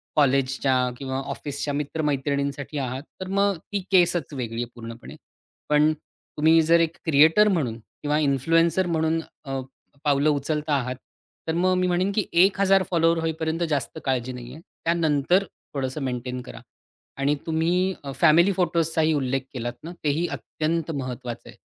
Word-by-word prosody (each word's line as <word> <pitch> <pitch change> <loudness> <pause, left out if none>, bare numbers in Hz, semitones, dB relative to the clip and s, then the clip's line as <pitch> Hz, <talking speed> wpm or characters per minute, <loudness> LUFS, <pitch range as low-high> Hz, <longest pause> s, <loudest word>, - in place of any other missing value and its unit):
कॉलेजच्या 135 -1 +2 0.2
किंवा 130 -1 -3
ऑफिसच्या 145 0 -4
मित्रमैत्रिणींसाठी 140 -1 -2
आहात. 130 0 -3 0.2
तर 185 - -4
मग 200 0 +1
ती 205 - 0
केसचं 175 -5 +3
वेगळी 115 -2 -3
आहे 120 - -8
पूर्णपणे. 115 0 -9 0.5
पण 150 +1 +4 0.5
तुम्ही 160 +2 +5
जर 165 +2 +4
एक 165 0 0
क्रिएटर 160 +7 +5
म्हणून 145 - 0
किंवा 145 +6 -3
इन्फ्लुएन्सर 165 +6 +2
म्हणून 160 -1 +1 0.3
अ, 135 -1 -3 0.4
पावलं 145 0 +3
उचलता 150 +1 -1
आहात, 125 -2 -2 0.5
तर 160 - 0
मग 185 +2 +2
मी 185 0 +2
म्हणेन 180 +2 +1
की 210 - +1 0.2
1 195 0 +2
हजार 195 -1 +4
फॉलोवर्स 165 -1 +2
होईपर्यंत 160 +1 -1
जास्त 145 0 -2
काळजी 130 -2 0
नाही 125 -1 -9
आहे. 155 - -11 0.2
त्यानंतर 165 +2 +2 0.3
थोडंसं 135 +1 -3
मेंटेन 125 0 -3
करा. 120 -2 -10 0.6
आणि 140 +2 +1
तुम्ही 175 +4 +1
अ, 140 - -5
फॅमिली 160 +7 +5
फोटोजचाही 165 -3 +1
उल्लेख 135 -2 0
केलात 120 -2 -3
ना. 165 - -6
ते 150 - +2
ही 160 +5 0
अत्यंत 165 +1 -2
महत्वाचं 125 -4 -5
आहे. - - -13
150 Hz, 150 wpm, -24 LUFS, 135-165 Hz, 0.6 s, तुम्ही